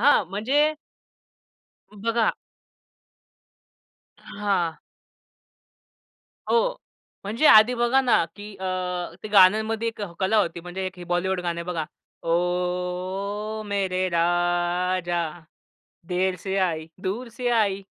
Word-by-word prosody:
हां. 255 -5 +5
म्हणजे 285 +10 +2 1.2
अ, 210 - -15
बघा. 230 0 +2 1.9
अ, - - -23 0.2
हां. 185 -6 0 1.7
हो. - - +2 0.5
म्हणजे 230 +10 +1
आधी 215 +3 +8
बघा 240 +2 +3
ना, 250 -9 +3
की 205 0 -9
अ - - -5 0.6
ते 215 - -6
गाण्यांमध्ये 215 +3 +4
एक 230 - -7 0.2
कला 190 +3 +2
होती 170 -4 0
म्हणजे 180 +2 -5
एक 185 0 -7
हे 175 - -8
बॉलिवूड 185 +1 0
गाणं 170 -1 -3
बघा. 170 -3 -2 0.4
ओ, 180 +4 -2
मेरे 190 -2 0
राजा! 175 +1 +1 0.9
देर 185 +1 0
से 190 +2 -3
आयी, 165 -4 0 0.2
दूर 215 +6 -3
से 250 -1 -1
आयी. 205 -4 +1
190 Hz, 110 wpm, -25 LUFS, 180-220 Hz, 1.9 s, आधी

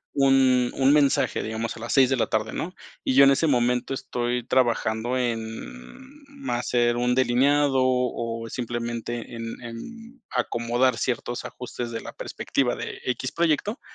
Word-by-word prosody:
un 130 -2 +4
un 135 +1 +4
mensaje, 145 -2 +2
digamos, 110 +1 -3
a - - -10
las 120 +1 -4
6 135 -2 +6
de - - +4
la - - +1
tarde, 110 0 -1
¿no?, 180 +3 -4 0.3
y 130 - 0
yo 140 - +8
en 135 - +7
ese 150 +4 +2
momento 125 0 +1
estoy 120 -1 -2
trabajando 120 -1 +1
en, 115 - -5
ma 275 - -4
hacer 120 -1 +1
un 125 +1 +1
delineado 135 +2 +3
o 120 -2 -1
simplemente 120 0 -4
en 115 0 -6
en 225 - -9
acomodar 120 +1 +1
ciertos 120 0 -2
ajustes 120 -1 -6
de 115 - -4
la - - -9
perspectiva 130 -3 -1
de - - -6
X 130 +1 -2
proyecto, 170 - 0
125 Hz, 155 wpm, -25 LUFS, 120-135 Hz, 0.3 s, yo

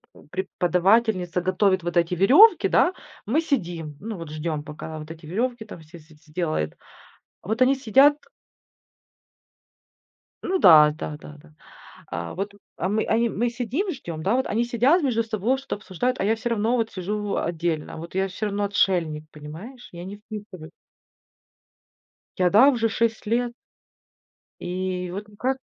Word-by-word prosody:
э, - - -16
преподавательница 185 +1 +1
готовит 185 0 +1
вот 175 +1 -2
эти 170 +1 +2
верёвки, 280 - +6
да, 360 - +3 0.3
мы 290 +9 +1
сидим, 170 - -3
ну, 215 -1 -6
вот 165 -2 -8
ждём, 155 -1 -3
пока 155 +1 -8
вот 155 +1 -9
эти 165 0 -11
верёвки 230 +7 -2
там 210 - -10
все 160 +3 -13
все 155 +1 -19
сделает. 155 - -3 0.7
Вот 220 +6 -1
они 265 +2 +5
сидят 270 +3 +5 2.3
Ну 380 - 0
да, 150 -4 +8
да-да-да. 150 +1 -9 0.6
А 85 -1 -5
вот 200 +2 -4 0.2
а 185 - -2
мы 215 +2 0
а 220 - +1
и 235 0 +2
мы 235 +3 -1
сидим, 250 - -2
ждём, 170 - -7
да. 200 +8 +1
Вот 260 - 0
они 230 +3 0
сидят 250 +9 +3
между 240 -5 +1
собой, 225 +3 -1
что-то 265 - -5
обсуждают, 215 +6 -2
а - - 0
я 220 +3 +3
всё 240 +2 -4
равно 230 +2 +1
вот 225 -2 -1
сижу 200 +3 -3
в 205 -1 -2
отдельно, 165 -2 -2
вот 170 +2 -9
я 190 - +2
всё 190 +3 -4
равно 205 0 -1
отшельник, 175 -6 +1
понимаешь? 165 - -10
Я 175 0 -8
не 195 +2 -7
вписываюсь. 205 -6 -10 1.7
Я, 180 -1 +3
да, 215 +9 +7
уже 230 -4 +1
6 225 0 -1
лет. 240 +2 0 1.1
И 180 0 -3
вот, 200 +3 -6
ну, 210 -1 -19
как? 260 +1 -1
195 Hz, 160 wpm, -24 LUFS, 170-235 Hz, 2.3 s, да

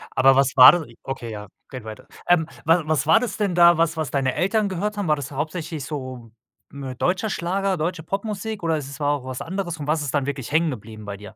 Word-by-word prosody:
Aber 135 0 +5
was 135 0 +2
war 125 - +11
das 175 -3 -1 0.2
okay, 120 -4 -5
ja, 105 -1 -7 0.2
geht 130 -3 -8
weiter. 110 -1 -10 0.2
Ähm, 170 -3 +3 0.2
wa 165 +2 +4
was 150 -3 0
war 160 - +6
das 225 -5 -4
denn 200 -5 0
da, 175 -1 +6
was 165 0 +1
was 155 -4 -2
deine 135 -2 0
Eltern 200 +5 +1
gehört 205 +3 -3
haben? 200 -3 -2
War 155 - +3
das 145 0 -7
hauptsächlich 155 +1 -4
so 130 -6 -7 0.4
m 135 -3 -7
deutscher 185 - 0
Schlager, 190 +1 -1
deutsche 165 +1 -2
Popmusik, 210 +3 -4
oder 165 -1 +1
ist 140 -2 -6
es 140 - -10
war 145 - +1
auch 140 -3 -4
was 130 -1 -5
anderes 175 -2 -4
und 145 - -6
was 155 +1 +1
ist 145 -3 -3
dann 145 -2 +1
wirklich 140 -3 -4
hängen 160 +2 +2
geblieben 110 -3 -9
bei 100 -1 -6
dir? 105 +1 -12
155 Hz, 245 wpm, -23 LUFS, 135-175 Hz, 0.4 s, war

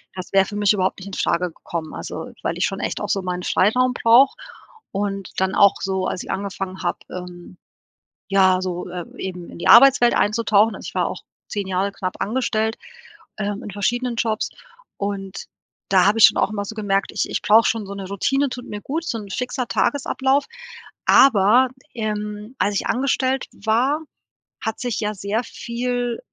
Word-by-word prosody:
Das 185 -1 -7
wäre 195 0 +5
für 205 - -8
mich 205 0 +3
überhaupt 190 0 0
nicht 190 - -9
infrage 180 -2 -1
gekommen, 160 0 -6
also - - -6
weil - - -2
ich - - +2
schon - - -3
echt - - -3
auch - - -4
so 195 - +1
meinen 180 -1 -4
Freiraum 250 +9 +2
brauche 245 - +5 0.6
und 195 -1 -3
dann 190 0 +1
auch 200 -1 +6
so, 190 -1 -1
als - - -3
ich - - -6
angefangen 195 -1 -4
habe, 175 - -1
ähm 180 0 -9 0.7
ja, 190 -2 +4
so, 180 -1 -4
äh 175 -1 -5
eben 180 -2 -6
in - - -11
die - - -2
Arbeitswelt 245 -1 +7
einzutauchen. 210 0 +3
Also, - - -8
ich - - -9
war - - +1
auch - - -6 0.3
10 205 -2 -4
Jahre 190 +1 0
knapp 185 -2 -4
angestellt, 220 -1 0 0.6
ähm, 205 -1 -3
in 205 - -7
verschiedenen 240 +5 -1
Jobs, 225 -1 -1 0.5
und 200 -1 -4 0.4
da 185 -2 +5
habe 210 - +3
ich - - +11
schon - - +3
auch - - +2
immer 205 -1 -3
so 220 - -6
gemerkt: 200 -2 0
„Ich - - -1
ich - - -2
brauche 220 +2 +5
schon 225 -3 -1
so 200 - -7
'ne 195 -1 -6
Routine 270 +8 0
tut 250 0 -7
mir 205 0 -6
gut, 315 +8 -3
so 235 - -2
'n 205 - -9
fixer 250 +4 -3
Tagesablauf“, 265 +2 +1 0.6
aber, 245 0 +6 0.3
ähm, 210 +1 -4
als 205 - +1
ich - - -1
angestellt 265 0 0
war, 240 +8 +1 0.6
hat 220 -1 -3
sich 245 -3 -2
ja 210 0 -1
sehr 200 +4 -2
viel, 245 0 -3
205 Hz, 185 wpm, -22 LUFS, 190-240 Hz, 0.7 s, ich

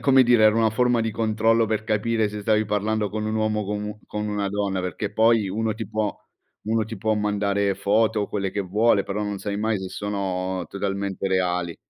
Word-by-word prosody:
come 135 -1 +5
dire, 120 -2 +4
era 110 0 +5
una 115 -1 +3
forma 120 +1 +2
di 115 0 -1
controllo, 110 +1 +2
per 110 0 -1
capire 110 0 +1
se 105 0 -6
stavi 110 +1 +2
parlando 105 +1 0
con 110 +1 -3
un 110 - -2
uomo 110 -1 0
o - - -3
con 105 +1 -3
u 105 0 -6
con 105 0 -3
una 105 -1 -1
donna, 100 -1 -1
perché 90 +3 -4
poi, 110 -1 +3
uno 110 +3 -1
ti 110 0 -5
può 110 -2 -1 0.5
uno 110 +1 0
ti 110 +1 -7
può 110 +2 +1
mandare 100 -1 0
foto, 110 +2 +2
o - - -4
quelle 100 -2 -2
che 100 - -2
vuole, 100 +2 +2
però 100 +1 -3
non 105 -1 -3
sai 100 +1 -3
mai 110 0 0
se 95 - -5
sono 95 -3 -3
totalmente 100 -1 -3
reali. 90 -2 0
105 Hz, 215 wpm, -24 LUFS, 100-110 Hz, 0.5 s, come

